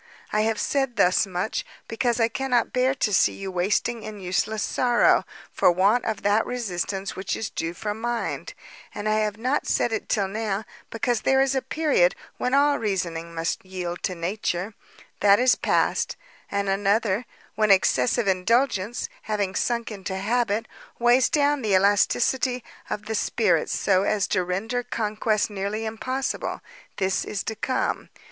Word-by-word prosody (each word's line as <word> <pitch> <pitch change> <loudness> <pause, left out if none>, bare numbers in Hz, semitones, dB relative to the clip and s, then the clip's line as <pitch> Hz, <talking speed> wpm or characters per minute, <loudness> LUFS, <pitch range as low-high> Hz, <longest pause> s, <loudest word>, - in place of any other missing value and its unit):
I 215 - +3
have 220 0 0
said 270 -4 0
thus 185 +1 +3
much, 185 +3 -2 0.2
because 240 +1 0
I 225 - +4
cannot 245 0 0
bear 255 +1 +2
to 215 -5 0
see - - +4
you 195 -1 -6
wasting 205 +6 0
in 215 -1 -8
useless 195 +4 -1
sorrow, 245 -1 +3 0.3
for - - +4
want 200 +7 +3
of 220 -3 -3
that 205 +2 +3
resistance 195 -4 -3
which 190 0 -3
is 220 - -4
due 165 +1 -3
from 210 +4 -4
mind; 240 0 -3 0.4
and 205 - -3
I 215 0 +2
have 210 -1 -1
not 255 +6 -1
said 240 - +1
it 220 - -3
till 200 -3 +1
now, 215 0 -2 0.2
because 230 0 -1
there 265 0 +3
is 270 0 +3
a 265 - +1
period 280 - +2 0.2
when 250 +2 0
all 285 +1 +4
reasoning 170 -5 -3
must 165 0 -2
yield 180 -2 -5
to 185 - -2
nature; 180 +2 -2 0.5
that 200 0 +6
is 250 +2 +5
past: - - 0 0.3
and 200 0 -1
another, 205 +3 +1 0.3
when 215 0 +1
excessive 195 - +3
indulgence, 210 +3 +1
having 205 -3 -2
sunk 235 +2 -1
into 190 -2 -5
habit, 225 +2 0 0.3
weighs 240 +1 +4
down 290 -1 +2
the 210 -4 +2
elasticity 240 +6 +2 0.3
of 210 - -4
the 220 - -3
spirits 205 -6 +1
so 190 -2 +3
as 200 0 +1
to 185 - +1
render 210 +8 -2
conquest 215 -2 -1
nearly 205 +2 -3
impossible; 255 +5 -3 0.4
this 190 -1 0
is 200 - -4
to 220 - -4
come. 255 +4 -2
215 Hz, 160 wpm, -25 LUFS, 195-240 Hz, 0.5 s, that